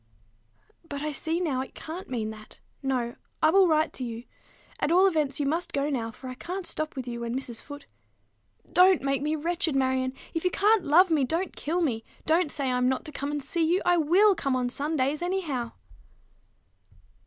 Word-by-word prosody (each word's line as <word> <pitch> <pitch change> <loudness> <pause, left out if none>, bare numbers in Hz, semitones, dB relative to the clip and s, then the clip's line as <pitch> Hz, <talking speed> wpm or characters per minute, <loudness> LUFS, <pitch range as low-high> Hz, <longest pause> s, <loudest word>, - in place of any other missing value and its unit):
"But 285 0 -4
I 305 - -1
see 320 +4 -1
now 290 -8 0
it 265 - -8
can't 335 +4 -7
mean 225 -4 -2
that. 215 0 -13 0.2
No: 250 -3 -1 0.3
I 315 - +6
will 385 0 +6
write 315 -1 +2
to 260 - -4
you. 230 -1 -5 0.6
At 295 - 0
all 365 +3 +6
events, 305 -7 +1
you 290 - 0
must 330 +5 -1
go 285 +1 0
now, 230 -4 -2
for 240 +4 -10
I 255 - -5
can't 360 +8 -5
stop 310 -2 -3
with 260 -2 -5
you 235 -1 -4
when 235 0 -3
Mrs. 250 -3 -4
Foote" 285 -1 -10 0.9
"Don't 365 -3 +6
make 275 0 0
me 305 +2 0
wretched, 330 -1 -1
Marion. 260 -1 +1 0.2
If 330 - -2
you 365 - +3
can't 415 +2 +3
love 345 +5 +5
me, 300 -4 +3
don't 330 +7 -1
kill 340 +4 -1
me. 235 -9 0 0.2
Don't 320 -1 +2
say 275 -3 -1
I'm 250 0 +2
not 260 - -1
to 305 - -7
come 280 0 -4
and 295 -1 -3
see 335 +3 0
you. 340 +4 +3
I 350 0 +4
will 365 +7 +5
come 275 -7 -1
on 250 -1 0
Sundays, 290 +1 -1
anyhow." 325 -10 -2
295 Hz, 200 wpm, -27 LUFS, 260-340 Hz, 0.9 s, I